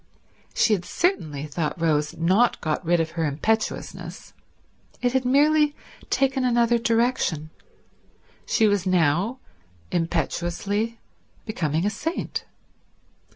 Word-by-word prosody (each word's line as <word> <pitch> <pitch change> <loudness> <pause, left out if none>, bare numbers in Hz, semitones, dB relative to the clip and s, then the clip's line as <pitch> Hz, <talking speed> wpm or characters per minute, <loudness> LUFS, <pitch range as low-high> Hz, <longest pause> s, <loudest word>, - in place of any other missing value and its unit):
She 220 - +4
had 185 -4 0
certainly, 155 - -1
thought 150 +2 -3
Rose, 155 -2 +1
not 190 +9 +3
got 155 +3 -2
rid 175 0 +2
of 160 -1 -1
her 165 -1 -2
impetuousness. 160 +10 -2 0.7
It 245 0 0
had 260 -1 +1
merely 295 +3 +4 0.3
taken 270 -1 +1
another 235 -1 +3
direction. 230 -10 0 1.0
She 220 - +3
was 205 -3 +1
now 180 - +2 0.5
impetuously 175 +6 -1 0.5
becoming 165 -6 -1
a 205 - +1
saint. 325 - -3
200 Hz, 110 wpm, -24 LUFS, 165-240 Hz, 1.0 s, She